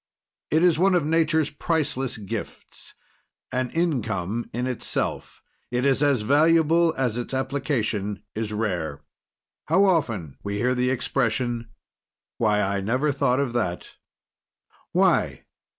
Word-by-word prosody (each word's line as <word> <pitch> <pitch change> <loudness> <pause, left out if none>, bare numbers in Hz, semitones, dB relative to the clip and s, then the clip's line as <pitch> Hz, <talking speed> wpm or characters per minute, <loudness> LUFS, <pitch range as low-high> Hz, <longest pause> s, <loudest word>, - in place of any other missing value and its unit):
It 160 +2 +3
is 170 -3 +4
one 190 +1 +4
of 170 -5 +2
Nature's 160 -1 +2
priceless 145 -5 -1
gifts; 100 -3 -8 0.6
an 130 0 -1
income 115 - -1
in 125 +2 -2
itself, 130 -2 -3 0.3
it 125 +2 -1
is 135 0 +3
as 140 -6 +2
valuable 165 +5 +4
as 125 -3 0
its 120 +2 -4
application 120 -7 -2
is 110 -1 -3
rare. 90 -10 -2 0.7
How 185 +5 +4
often 115 - 0
we 100 0 -3
hear 125 +4 +1
the 125 0 +1
expression 120 -2 -1 0.7
"Why, 105 -2 +2
I 100 0 -1
never 130 +9 +1
thought 130 -2 +1
of 135 -4 -1
that!" 95 -8 -3 0.9
Why? - - +2
125 Hz, 125 wpm, -24 LUFS, 110-150 Hz, 0.9 s, is